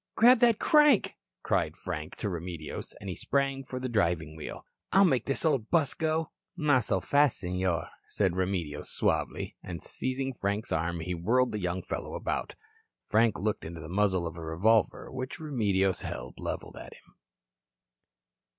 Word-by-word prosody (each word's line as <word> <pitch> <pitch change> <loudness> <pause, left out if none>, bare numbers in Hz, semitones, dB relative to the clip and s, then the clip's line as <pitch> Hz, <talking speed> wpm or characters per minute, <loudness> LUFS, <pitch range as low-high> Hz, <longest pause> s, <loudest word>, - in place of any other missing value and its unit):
"Grab 245 +2 +7
that 235 -3 +5
crank," 300 -6 +4 0.3
cried - - 0
Frank - - -5
to - - -3
Remedios, 85 -4 -5
and 100 - -9
he 90 - -3
sprang 135 -1 0
for 130 -1 -6
the 130 - -3
driving 85 -9 0
wheel. 80 - -7 0.3
"I'll 195 +1 +6
make 130 -9 +2
this 135 +4 0
old 135 -8 +1
bus 160 -5 +3
go." 160 -1 -1 0.3
"Not 145 -6 +3
so - - +1
fast, 145 -2 +3
Senor," 90 -1 -1 0.2
said 95 -4 0
Remedios 90 -6 -2
suavely, - - -1
and 85 -2 -6
seizing 130 - -3
Frank's 100 -1 -2
arm 85 +1 -1
he 90 +3 -3
whirled 120 +9 +2
the 105 - -3
young 90 0 -2
fellow - - -5
about. - - -3 0.5
Frank 110 -3 +3
looked 105 +3 -1
into 80 +1 -7
the 80 -1 -8
muzzle 95 -2 +1
of 85 0 -5
a - - -7
revolver 100 +7 +2
which 130 0 -5
Remedios 100 - +1
held - - -6
leveled - - -5
at - - -9
him. - - -22
105 Hz, 165 wpm, -29 LUFS, 90-135 Hz, 0.5 s, Grab